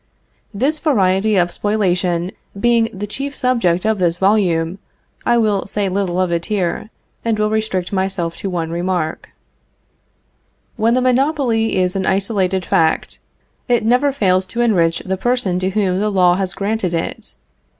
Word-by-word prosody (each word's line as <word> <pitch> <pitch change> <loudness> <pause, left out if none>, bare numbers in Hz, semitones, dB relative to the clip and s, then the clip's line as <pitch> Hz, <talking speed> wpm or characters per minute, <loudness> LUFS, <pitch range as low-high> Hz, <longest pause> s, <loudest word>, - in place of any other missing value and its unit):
This 275 +9 0
variety 205 - +2
of 175 -2 +2
spoliation 180 -4 0 0.3
being 235 0 +3
the 200 +1 -5
chief 275 +7 -5
subject 220 -9 +1
of 220 -2 +1
this 175 -1 +1
volume, 185 -3 +1 0.5
I 240 - +4
will 210 -4 +1
say 200 -1 -1
little 185 -2 -1
of 185 -2 +1
it 170 0 -1
here, 200 0 -2 0.3
and 230 -2 0
will 210 0 0
restrict 215 -4 -1
myself 190 -3 -1
to 195 - -4
one 165 -3 -3
remark: 175 -2 -2 1.5
When 230 +1 +2
the 255 - +2
monopoly 255 -3 +1
is 185 0 +1
an 190 -1 -1
isolated 190 -2 0
fact, 160 -1 +1 0.5
it 240 -3 +2
never 250 +5 +3
fails 185 -7 +1
to 235 - -3
enrich 175 -8 +2
the 190 0 -2
person 240 -5 0
to 185 +1 0
whom 190 -2 0
the 210 +1 +1
law 180 -3 +4
has 190 0 -2
granted 200 -3 -1
it. 165 - -4
195 Hz, 155 wpm, -18 LUFS, 180-225 Hz, 1.5 s, I